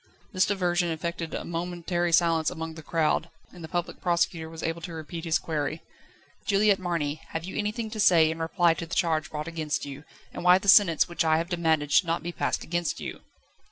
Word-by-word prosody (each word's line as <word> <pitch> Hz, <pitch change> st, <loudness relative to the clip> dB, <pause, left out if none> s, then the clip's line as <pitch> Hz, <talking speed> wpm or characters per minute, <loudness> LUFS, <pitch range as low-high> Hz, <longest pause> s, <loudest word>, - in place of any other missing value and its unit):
This 185 Hz, 0 st, +3 dB
diversion 180 Hz, -3 st, +1 dB
effected 165 Hz, 0 st, -4 dB
a -, -, -4 dB
momentary 175 Hz, 0 st, -2 dB
silence 165 Hz, -1 st, +3 dB
among 160 Hz, -2 st, -6 dB
the 160 Hz, -, -10 dB
crowd, 160 Hz, +1 st, 0 dB, 0.2 s
and 175 Hz, -2 st, -11 dB
the -, -, -6 dB
Public 175 Hz, +1 st, -4 dB
Prosecutor 170 Hz, -2 st, 0 dB
was 160 Hz, 0 st, -8 dB
able 165 Hz, +1 st, -2 dB
to 170 Hz, +1 st, -7 dB
repeat 160 Hz, +1 st, -7 dB
his 165 Hz, -1 st, +2 dB
query: 155 Hz, 0 st, -3 dB, 0.6 s
"Juliette 200 Hz, 0 st, +3 dB
Marny, 160 Hz, -5 st, -2 dB
have 165 Hz, -, -3 dB
you 185 Hz, -, -7 dB
anything 215 Hz, +1 st, -2 dB
to 215 Hz, -, -6 dB
say 170 Hz, -6 st, +5 dB
in 160 Hz, -, -6 dB
reply 165 Hz, +1 st, +2 dB
to 165 Hz, 0 st, -6 dB
the 170 Hz, -, -4 dB
charge 160 Hz, -3 st, +1 dB
brought 150 Hz, 0 st, -5 dB
against 155 Hz, -3 st, -3 dB
you, 140 Hz, +1 st, -8 dB, 0.3 s
and -, -, -6 dB
why 180 Hz, +1 st, +7 dB
the 195 Hz, -, -7 dB
sentence 190 Hz, -5 st, +6 dB
which 170 Hz, 0 st, -1 dB
I 160 Hz, -1 st, +3 dB
have 165 Hz, +2 st, -2 dB
demanded 160 Hz, -4 st, +1 dB
should 180 Hz, -, +4 dB
not 165 Hz, -1 st, -1 dB
be 175 Hz, -, -3 dB
passed -, -, -2 dB
against 175 Hz, 0 st, -2 dB
you?" -, -, -6 dB
170 Hz, 210 wpm, -27 LUFS, 160-175 Hz, 0.6 s, why